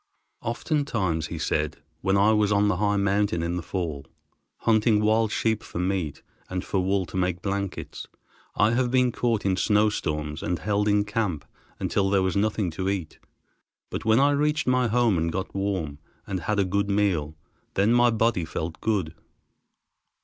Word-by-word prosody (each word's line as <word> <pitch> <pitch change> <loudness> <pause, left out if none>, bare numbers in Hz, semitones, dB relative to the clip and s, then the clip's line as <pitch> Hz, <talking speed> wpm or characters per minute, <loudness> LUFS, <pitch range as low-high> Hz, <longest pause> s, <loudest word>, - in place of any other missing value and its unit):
"Oftentimes," 115 - -1
he 85 - -6
said, 75 -1 -1 0.2
"when 95 +1 +2
I 100 +2 +5
was 105 -1 +2
on 105 0 +3
the 90 - +1
high 105 +1 +1
mountains 100 -3 +1
in 85 +1 -1
the 90 - -2
fall, 80 -5 -4 0.5
hunting 110 -1 +3
wild 110 0 +2
sheep 110 -1 0
for - - -9
meat, 90 -4 -2 0.3
and 90 -1 -3
for 95 - 0
wool 95 0 +1
to - - -12
make 90 -1 -1
blankets, 100 -1 -4 0.5
I 105 +2 +3
have 125 +1 +1
been 125 0 +3
caught 115 -3 -1
in 95 -1 +2
snowstorms 80 -8 0
and 90 - -1
held 105 +4 0
in 105 0 +3
camp 105 -8 -2 0.3
until 95 -1 0
there 95 -1 +3
was 95 -2 0
nothing 105 -2 0
to 95 +4 -2
eat, 95 -6 -4 0.7
but - - -4
when 110 +1 +4
I 140 +1 +4
reached 150 +1 +1
my 125 -1 +2
home 115 -5 +2
and 85 +1 0
got 95 +3 -4
warm, 95 -7 -2 0.3
and 95 -2 -3
had 105 +5 -1
a 100 - +3
good 100 +2 0
meal, 95 -7 +1 0.4
then 105 +4 +3
my 120 0 +5
body 115 -5 +1
felt 80 0 -5
good. 95 -8 0
100 Hz, 175 wpm, -25 LUFS, 90-110 Hz, 0.7 s, I